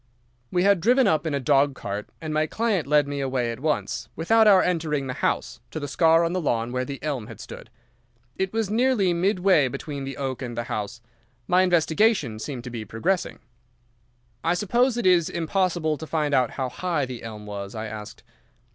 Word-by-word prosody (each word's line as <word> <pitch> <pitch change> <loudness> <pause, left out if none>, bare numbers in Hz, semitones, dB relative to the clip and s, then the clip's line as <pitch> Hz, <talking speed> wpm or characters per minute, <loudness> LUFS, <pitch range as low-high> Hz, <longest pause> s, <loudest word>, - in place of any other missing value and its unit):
"We 180 - +2
had 200 -3 +4
driven 250 +7 +4
up 160 -4 +2
in 150 - -1
a - - 0
dog 140 +1 +3
cart, 100 -2 -5
and 155 -2 -4
my 155 0 +1
client 210 - 0
led 150 -1 +3
me 140 0 -3
away 130 -3 -1
at 115 - -7
once, 150 +2 -2
without 220 +7 +4
our 195 -3 +7
entering 155 -5 0
the 130 - -3
house, 125 -1 -2
to 155 - -5
the 145 - -4
scar 165 +3 +4
on 170 +1 0
the 185 - -1
lawn 120 -5 -1
where 125 0 -1
the 140 +1 -5
elm 135 -8 -3
had - - -11
stood. - - -10 0.7
It 190 0 -1
was 225 -1 0
nearly 225 -6 +2
midway 180 -4 +3
between 140 +2 -5
the 135 0 -6
oak 135 -2 -3
and 120 -2 -5
the 120 - -1
house. 115 +2 -5 0.5
My 180 +1 +4
investigation 175 - +2
seemed 125 0 -5
to 125 - -7
be 115 -2 -5
progressing. 165 - -2 1.0
"'I 170 +2 +2
suppose 240 +6 +1
it 240 - -2
is 180 -3 +4
impossible 170 -2 0
to 160 - -7
find 150 -3 -1
out 125 -3 +3
how 130 -2 -1
high 170 -2 -1
the 125 -2 -7
elm 110 -2 -8
was?' 100 0 -6
I 110 0 -4
asked. 110 -1 -8
155 Hz, 200 wpm, -25 LUFS, 125-180 Hz, 1.0 s, our